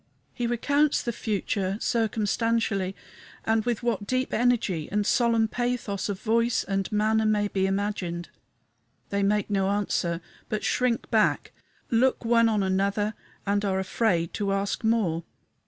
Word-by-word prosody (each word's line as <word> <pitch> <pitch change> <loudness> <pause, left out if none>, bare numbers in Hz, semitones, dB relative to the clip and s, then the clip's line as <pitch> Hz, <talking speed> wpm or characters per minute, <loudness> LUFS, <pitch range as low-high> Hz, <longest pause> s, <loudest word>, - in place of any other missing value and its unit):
He 240 -2 -2
recounts 285 +5 +2
the 240 - -1
future, 200 -2 -1
circumstantially, 220 -3 0 0.5
and 220 0 +2
with 240 -1 -1
what 230 -4 -1
deep 255 +2 -1
energy 220 -10 +1
and 205 0 +1
solemn 230 -1 +3
pathos 240 -5 -2
of 195 -2 -3
voice 230 +2 +1
and 195 -1 -2
manner 215 +1 +2
may 210 -1 +2
be 190 -1 0
imagined. 195 -3 -2 0.8
They 200 0 0
make 210 +1 +1
no 195 -1 +1
answer, 185 -4 0 0.3
but 215 -1 -2
shrink 250 -1 0
back, 220 -2 +2 0.4
look 245 +1 +2
one 230 0 +4
on 210 -3 +1
another, 200 +3 0 0.3
and 205 0 +1
are 195 -2 0
afraid 185 -3 0
to 200 -2 -1
ask 195 +2 -1
more. 205 -8 +1
210 Hz, 140 wpm, -26 LUFS, 195-230 Hz, 0.8 s, one